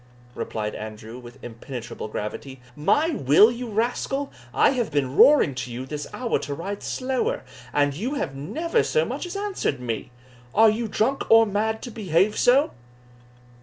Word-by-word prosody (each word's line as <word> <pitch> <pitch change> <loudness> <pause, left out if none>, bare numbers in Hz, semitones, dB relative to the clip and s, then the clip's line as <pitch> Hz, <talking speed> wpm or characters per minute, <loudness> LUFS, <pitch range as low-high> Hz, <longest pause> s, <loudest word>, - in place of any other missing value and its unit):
replied 105 -3 -4
Andrew, 110 +2 -8
with 120 +1 -12
impenetrable 120 -1 -7
gravity. 115 +5 -6 0.2
"My 295 - +2
will, 205 - +5
you 240 0 -5
rascal? 245 +5 -1 0.2
I 270 - +4
have 245 -5 -1
been 140 -3 -1
roaring 280 - +6
to 125 -1 -5
you 125 +2 -5
this 150 +2 -5
hour 245 -2 -1
to 145 - -5
ride 195 +6 -5
slower, 260 -1 -2 0.3
and 145 -1 +2
you 235 - -3
have 275 - -2
never 325 - 0
so 475 - +1
much - - -4
as 355 - -7
answered 395 - -2
me 125 +1 -4 0.5
Are 220 0 +7
you 225 +2 -2
drunk 230 +6 -1
or 225 0 +7
mad 220 +2 -1
to 245 - -6
behave 200 -1 +1
so?" 265 +4 +4
205 Hz, 165 wpm, -24 LUFS, -, 0.5 s, Are